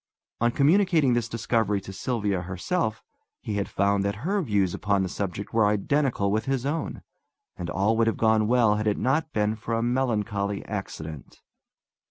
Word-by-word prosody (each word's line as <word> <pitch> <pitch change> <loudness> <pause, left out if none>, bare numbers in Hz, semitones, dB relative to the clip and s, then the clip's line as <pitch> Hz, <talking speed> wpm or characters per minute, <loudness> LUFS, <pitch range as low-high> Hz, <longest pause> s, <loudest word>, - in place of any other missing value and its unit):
On 120 - +3
communicating 155 +1 +3
this 120 -1 0
discovery 110 -3 0
to 95 0 -9
Sylvia 105 -4 -1
herself 110 - -2 0.4
he 105 -2 -4
had 100 - -2
found 100 0 +1
that 100 +6 -3
her 200 +2 +1
views 100 - +1
upon 100 -2 +1
the 95 - -2
subject 100 +1 -4
were 110 -2 +4
identical 105 0 +1
with 110 +2 0
his 135 -2 -1
own; 155 +3 -3 0.5
and 85 -1 -5
all 100 +5 +1
would 115 0 +3
have 115 - +1
gone 110 -1 +3
well 115 -3 +4
had 105 +1 -1
it 105 - +1
not 150 +5 0
been 105 -2 0
for 115 +1 -3
a 115 - 0
melancholy 105 -5 -1
accident. 80 -8 -7
110 Hz, 175 wpm, -26 LUFS, 100-125 Hz, 0.5 s, were